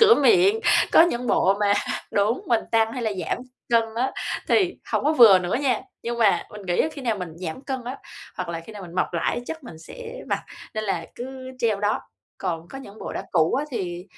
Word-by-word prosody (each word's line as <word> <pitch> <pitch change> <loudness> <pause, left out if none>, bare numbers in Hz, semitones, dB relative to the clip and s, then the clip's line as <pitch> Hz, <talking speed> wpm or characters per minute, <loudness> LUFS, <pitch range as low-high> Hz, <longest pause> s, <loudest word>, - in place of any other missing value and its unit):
cửa 450 0 +8
miệng, 400 +1 +4 0.3
có - - +9
những 250 -8 0
bộ 195 -3 +3
mà 205 -1 +4 0.4
đúng, 210 +5 +1
mình 235 -2 +3
tăng 225 0 +3
hay 250 - -4
là 220 -2 0
giảm - - -1 0.3
cân 230 -1 +6
á, 260 +3 0 0.4
thì 370 -3 +3 0.2
hổng - - +1
có 305 - +4
vừa 225 -9 +8
nữa 180 0 -2
nha, 255 -6 +1 0.2
nhưng 235 0 -3
mà 215 -3 +3
mình 210 -1 -9
nghĩ 175 0 +1
á - - +2
khi 280 - -8
nào 225 -5 0
mình 180 -2 -4
giảm 170 +3 -5
cân 260 -3 -4
á, 255 +3 -5 0.4
hoặc 180 -2 -4
là 165 -1 -3
khi 195 +7 -12
nào 205 -2 -8
mình 170 -1 -10
mập 185 - 0
lại 170 - 0
á - - -2
chắc 320 -3 -6
mình 160 -10 -10
sẽ 485 - -9
mặc, - - 0 0.3
nên 215 0 -2
là 175 -5 -1
cứ 260 +1 -7
treo 220 -4 +1
đó. 205 0 +1 0.4
Còn 170 -3 -3
có 270 - -8
những 220 -5 -11
bộ - - -6
đã - - -4
cũ 160 +6 +3
á 280 - 0
thì 180 -6 -4
225 Hz, 235 wpm, -24 LUFS, 185-265 Hz, 0.4 s, có